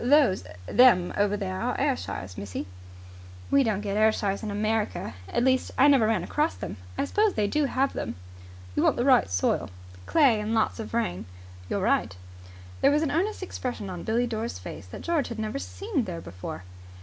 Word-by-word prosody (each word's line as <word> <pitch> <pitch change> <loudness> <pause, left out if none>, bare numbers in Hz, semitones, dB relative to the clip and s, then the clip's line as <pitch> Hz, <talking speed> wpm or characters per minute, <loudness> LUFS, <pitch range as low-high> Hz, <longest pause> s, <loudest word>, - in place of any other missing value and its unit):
"Those 260 - +4 0.2
them 215 - +5
over 205 0 +1
there 95 - -3
are - - -1
Ayrshires, 90 +1 -2
missy." 100 0 -5 0.9
"We 280 - +5
don't 215 -4 0
get 205 -1 -2
Ayrshires 215 -2 +2
in 215 - -4
America. 215 +1 -1 0.2
At 240 - 0
least, 260 0 +2
I 270 - +6
never 270 -6 +5
ran 215 -6 +1
across 300 - 0
them. - - -6 0.2
I - - +1
suppose 420 - +2
they 210 - +2
do 295 +8 +1
have 270 +1 0
them." - - -4 0.6
"You - - +2
want - - +3
the 240 - 0
right 260 - +5
soil." 90 0 0 0.4
"Clay 270 -9 +4
and 215 +2 -1
lots 220 +1 +1
of 225 +1 -5
rain." 90 - -1 0.4
"You're - - -1
right." 95 - +1 0.7
There - - +6
was 295 +2 +2
an 305 - 0
earnest 380 +6 -1
expression 245 - -4
on 175 -2 -6
Billie 230 +5 +1
Dore's 230 0 -3
face - - -9
that - - -9
George 330 -5 0
had 230 - -6
never 220 +4 -3
seen 390 - -3
there 175 -3 -5
before. 90 - -7
225 Hz, 190 wpm, -27 LUFS, 200-275 Hz, 0.9 s, I